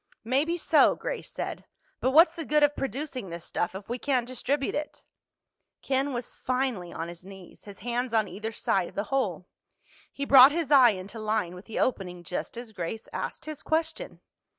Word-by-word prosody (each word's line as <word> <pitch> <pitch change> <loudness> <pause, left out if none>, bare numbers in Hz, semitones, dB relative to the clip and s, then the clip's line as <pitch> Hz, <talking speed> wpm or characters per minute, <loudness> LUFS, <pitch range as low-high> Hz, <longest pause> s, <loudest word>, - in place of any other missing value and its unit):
"Maybe 280 +9 +1
so," - - +4
Grace - - -5
said. - - -5 0.3
"But 260 - +1
what's 320 +5 +6
the 330 - -4
good 300 0 +3
of 290 0 +4
producing 270 -6 -4
this 170 0 -7
stuff 175 +2 -2
if 195 +1 -8
we 240 +2 -3
can't 255 -3 +1
distribute 265 +3 -1
it?" 300 0 -5 0.8
Ken 275 +1 0
was 240 -2 -5
finally 250 -9 -1
on 165 - -5
his 170 +1 -10
knees, 190 -1 -13
his 200 -2 -10
hands 245 0 -1
on 220 -2 +2
either 215 +5 -5
side 190 -4 0
of - - -19
the 200 - -1
hole. 190 - 0 0.7
He 280 - -4
brought 270 0 +9
his 320 -2 -2
eye 260 -4 +8
into 195 +4 -8
line 215 -5 -1
with 180 +2 -11
the 225 - -7
opening 180 -7 -1
just 180 +6 -5
as 240 -2 -7
Grace 205 +3 -5
asked - - -5
his 310 -2 -6
question. 320 +9 -2
245 Hz, 190 wpm, -27 LUFS, 195-280 Hz, 0.8 s, brought